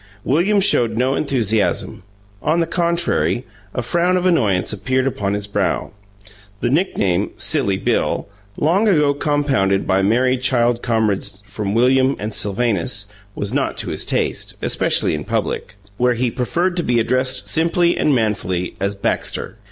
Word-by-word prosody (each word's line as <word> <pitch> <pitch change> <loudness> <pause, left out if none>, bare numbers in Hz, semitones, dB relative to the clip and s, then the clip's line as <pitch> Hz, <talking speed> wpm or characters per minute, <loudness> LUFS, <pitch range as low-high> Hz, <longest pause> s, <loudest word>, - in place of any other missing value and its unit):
William 180 +9 +2
showed 120 - +3
no 130 +2 +2
enthusiasm; 115 -8 0 0.4
on 160 +3 +1
the 165 - +2
contrary, 170 -7 0 0.3
a 125 - -1
frown 175 +7 +1
of 180 - -1
annoyance 110 - +2
appeared 130 +5 0
upon 100 -6 -1
his 105 0 -3
brow. 100 - -1 0.7
The 120 - 0
nickname 105 - +1
"Silly 130 -12 +2
Bill" - - -1 0.3
long 185 +9 +2
ago 150 -7 +3
compounded 140 -10 +1
by 95 +1 +2
merry 125 +6 +2
child 120 -2 +1
comrades 105 -4 -1
from 100 0 -3
"William" 130 +3 +3
and 105 +1 -5
"Sylvanus" 100 -2 -1 0.3
was 100 - -3
not - - -1
to - - -3
his - - -1
taste, - - -2
especially - - +2
in 75 -1 -3
public, 90 - -3 0.2
where 125 +1 +2
he 120 0 0
preferred 175 +9 -1
to 175 - 0
be 120 -4 +1
addressed 130 -3 0
simply 170 - +2
and 150 - +2
manfully 95 -6 -1
as 100 +1 -1
"Baxter." 100 - -2
125 Hz, 150 wpm, -19 LUFS, 100-150 Hz, 0.7 s, showed